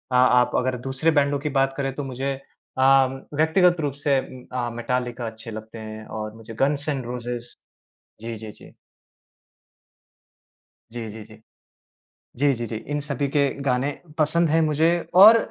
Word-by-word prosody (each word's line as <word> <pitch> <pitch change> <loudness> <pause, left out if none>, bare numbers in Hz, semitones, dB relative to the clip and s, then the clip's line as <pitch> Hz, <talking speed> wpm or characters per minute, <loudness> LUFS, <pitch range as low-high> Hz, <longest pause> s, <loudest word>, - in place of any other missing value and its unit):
आप 125 -1 +5
अगर 125 0 0
दूसरे 135 +5 +1
बैंडों 140 0 +1
की 150 +1 -2
बात 135 0 +2
करें 135 -1 -1
तो 145 - -3
मुझे 135 +1 -3 0.5
अम, 135 0 +4 0.2
व्यक्तिगत 175 +3 +4
रूप 145 -2 -1
से 140 -2 +4
उम, 130 -1 -9
अ, 120 -1 -1
मेटालिका 120 0 -2
अच्छे 110 +1 -8
लगते 110 +1 -8
हैं 110 0 -8
और 110 -1 -5
मुझे 115 0 -10
गन्स 145 +1 0
एण्ड 135 -4 -2
रोज़ेज़ 120 0 -5 0.7
जी, 115 0 -5
जी, 110 0 -8
जी। - - -15 2.2
जी, 115 -1 -5
जी, 110 +1 -9
जी। 110 +1 -16 1.0
जी, 140 +3 +3
जी, 120 -1 -4
जी, 115 - -4
इन 145 +7 -4
सभी 140 -1 -2
के 140 +1 +2 0.2
गाने 130 +1 +1 0.3
पसंद 160 +2 +3
हैं 165 +1 +4
मुझे 155 +1 +3 0.3
और 210 +5 +10
130 Hz, 160 wpm, -24 LUFS, 120-145 Hz, 2.2 s, और